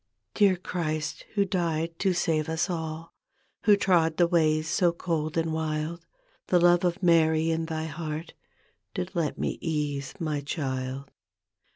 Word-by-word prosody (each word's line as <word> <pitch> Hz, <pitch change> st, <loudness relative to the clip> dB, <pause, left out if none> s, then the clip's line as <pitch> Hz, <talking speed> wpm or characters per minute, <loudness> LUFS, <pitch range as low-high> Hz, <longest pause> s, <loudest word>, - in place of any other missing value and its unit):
Dear 200 Hz, -3 st, +4 dB
Christ, 155 Hz, -4 st, -3 dB
Who 200 Hz, -1 st, +3 dB
died 165 Hz, -3 st, -1 dB
to 195 Hz, -, +2 dB
save 160 Hz, -3 st, 0 dB
us 160 Hz, +3 st, 0 dB
all. 160 Hz, -1 st, -5 dB, 0.5 s
Who 205 Hz, -1 st, +6 dB
trod 165 Hz, -5 st, +2 dB
the 175 Hz, -, +5 dB
ways 155 Hz, -2 st, +2 dB
so 175 Hz, +1 st, +3 dB
cold 165 Hz, -2 st, -2 dB
and 165 Hz, -1 st, 0 dB
wild. 160 Hz, +1 st, -3 dB, 0.4 s
The 180 Hz, -, +4 dB
love 175 Hz, 0 st, +5 dB
of 180 Hz, +2 st, 0 dB
Mary 160 Hz, -1 st, +4 dB
in 160 Hz, 0 st, -1 dB
thy 160 Hz, -1 st, -3 dB
heart 160 Hz, +1 st, -5 dB, 0.6 s
Did 90 Hz, -, -3 dB
let 165 Hz, -3 st, -1 dB
me -, -, -2 dB
ease 145 Hz, -4 st, -2 dB
my 155 Hz, -4 st, -1 dB
child. 135 Hz, -2 st, -4 dB
160 Hz, 150 wpm, -27 LUFS, 155-175 Hz, 0.6 s, Who